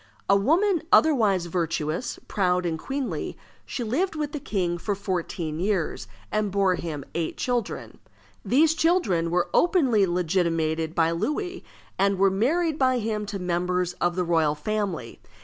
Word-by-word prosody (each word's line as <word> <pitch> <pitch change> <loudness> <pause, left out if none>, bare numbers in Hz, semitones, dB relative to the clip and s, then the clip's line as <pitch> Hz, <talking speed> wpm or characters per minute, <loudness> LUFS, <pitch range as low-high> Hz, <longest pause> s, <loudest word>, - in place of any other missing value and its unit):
A 200 - +5
woman 330 - +3
otherwise 215 - +4
virtuous, 170 +3 -2
proud, 180 -2 +1
and 160 -2 -2
queenly, 270 - -4 0.3
she 245 - -3
lived 315 - -1
with 300 -2 -2
the 295 - -4
king 180 -8 -2
for 205 +4 -2
fourteen 175 -5 -3
years, 180 - -1 0.2
and 215 -1 0
bore 195 -1 +3
him 155 -6 -5
eight 165 -2 -2
children. 245 -4 -3 0.4
These 310 +5 +4
children 320 - +2
were 175 +1 0
openly 265 - +3
legitimated 165 -2 0
by 165 0 +3
Louis, 355 - -2 0.4
and 195 0 +3
were 195 0 +4
married 305 - +1
by 255 -1 +3
him 215 -2 -2
to 205 - -4
members 180 0 -1
of 175 0 +1
the 180 - 0
royal 160 -3 +2
family. 195 - -3
195 Hz, 150 wpm, -25 LUFS, 170-255 Hz, 0.4 s, A